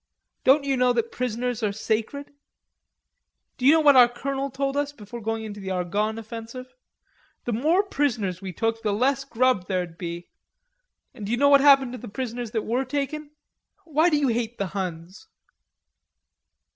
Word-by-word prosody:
"Don't 275 +3 +5
you 275 -1 0
know 250 0 +3
that 230 -1 -1
prisoners 245 0 -2
are 210 -2 0
sacred?" 225 +7 -3 1.3
"D'you 260 +3 +6
know 320 - +4
what 290 -2 +6
our 250 -2 +8
colonel 275 +3 -3
told 275 +1 -2
us 285 0 -1
before 235 -3 -10
going 225 +1 -3
into 210 -1 -7
the 190 -1 -6
Argonne 200 +4 -1
offensive? 230 +3 -8 0.7
The 240 - -1
more 315 - +2
prisoners 235 - -1
we 190 -1 -5
took, 225 +4 -1
the 210 -2 0
less 265 +5 +1
grub 255 -7 +1
there'ld 180 -3 -3
be; 170 0 -6 0.8
and 215 - -10
do - - -3
you 240 - +1
know 285 +3 +4
what 280 -1 +7
happened 275 -3 +6
to 250 - -7
the 245 - -9
prisoners 240 +1 -4
that 220 0 -2
were 245 +4 0
taken? 285 +3 -3 0.6
Why 315 +2 +3
do 300 - +2
you 285 -3 +1
hate 235 0 -2
the 200 - -2
Huns?" 185 - -6
240 Hz, 170 wpm, -25 LUFS, 215-275 Hz, 1.3 s, our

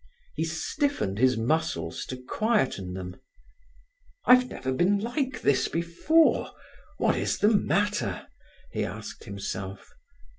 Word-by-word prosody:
He 160 - -1
stiffened 165 - -1
his 130 -1 +4
muscles 115 - -1
to 130 - -5
quieten 125 - 0
them. 90 -1 -6 1.1
"I've 250 0 +6
never 130 0 -4
been 180 +10 +3
like 260 +5 -2
this 140 -2 +3
before. 170 - +2 0.4
What - - +2
is - - 0
the 210 - +4
matter?" 205 +3 0 0.5
he - - -1
asked - - -7
himself. 100 -1 -6
160 Hz, 115 wpm, -27 LUFS, -, 1.1 s, I've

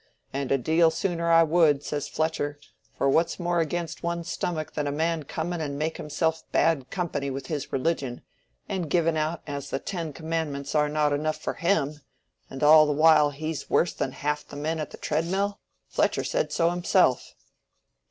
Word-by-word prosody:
'And 135 -1 -2
a 135 - +4
deal 160 +6 +3
sooner 170 0 -1
I 165 0 +7
would,' 155 -3 +3
says 145 -1 -3
Fletcher; 155 -2 -2 0.4
'for - - +1
what's 165 +6 +2
more 175 0 0
against 170 +1 -2
one's 170 0 -3
stomach 155 -3 -3
than 150 -1 -2
a - - 0
man 160 +2 0
coming 165 +3 -3
and 140 -2 -3
making 155 +2 -2
himself 160 +1 0
bad 150 -6 +2
company 150 -7 -2
with 135 0 -5
his 145 0 -4
religion, 135 -3 -1 0.4
and 175 -5 -3
giving 165 0 +2
out 155 +2 -1
as 140 -1 -5
the - - -1
Ten 165 +1 -4
Commandments 155 -3 -3
are 150 -1 +3
not 150 -1 +1
enough 155 +2 -1
for - - -3
him, 150 -5 0 0.5
and 135 +2 -6
all 155 +1 +8
the - - +1
while 155 0 +6
he's 155 +2 -5
worse 175 - +2
than 130 - -3
half 150 0 -2
the - - -10
men 155 +3 -2
at 155 - -4
the - - -11
tread 155 +2 -1
mill?' 200 +3 -1 0.3
Fletcher - - +1
said - - -1
so 170 0 +2
himself." 175 -6 +2
155 Hz, 185 wpm, -26 LUFS, 145-170 Hz, 0.5 s, all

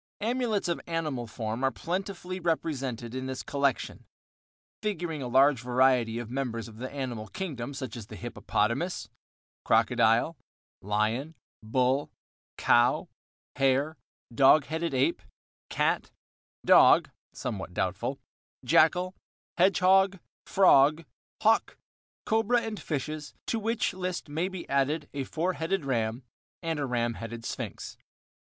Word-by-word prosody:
Amulets 230 -3 0
of 170 - -1
animal 155 -8 -2
form 110 +2 -4
are 135 - +4
plentifully 185 +3 -4
represented 135 -8 -2
in 130 0 -4
this 130 -1 -4
collection, 140 -2 -1 0.8
figuring 175 -7 -3
a 125 - -3
large 135 +1 +4
variety 125 -2 +2
of 120 -1 -4
members 125 -4 -3
of 110 -1 -13
the 130 +3 -5
animal 125 -6 -4
kingdom 140 - -5
such 130 -5 -5
as 115 -4 -8
the - - -9
hippopotamus, - - -2 0.5
crocodile, 115 +9 +3 0.5
lion, 110 +10 -1 0.3
bull, 130 +5 +1 0.5
cow, 120 +1 +3 0.5
hare, 135 +3 +2 0.4
dog 135 +3 +6
headed 160 -1 -2
ape, 130 +1 +1 0.5
cat, - - 0 0.6
dog - - +6 0.2
(somewhat - - -5
doubtful), - - -2 0.5
jackal, 180 +4 +4 0.5
hedgehog, 190 +1 +4 0.3
frog, 155 -4 +5 0.4
hawk, - - +3 0.5
cobra 225 +2 +2
and 220 -2 -5
fishes, 150 0 -4
to 230 - -1
which 225 +2 0
list 180 -2 -4
may 160 +5 -1
be 190 -2 -7
added 145 +2 0
a 140 -2 -3
four 175 +6 -1
headed 170 -1 -2
ram 115 -1 -1 0.4
and 165 -2 -1
a 140 - -1
ram 120 -1 0
headed 115 +1 -7
sphinx. - - -6
140 Hz, 120 wpm, -28 LUFS, 125-175 Hz, 0.8 s, dog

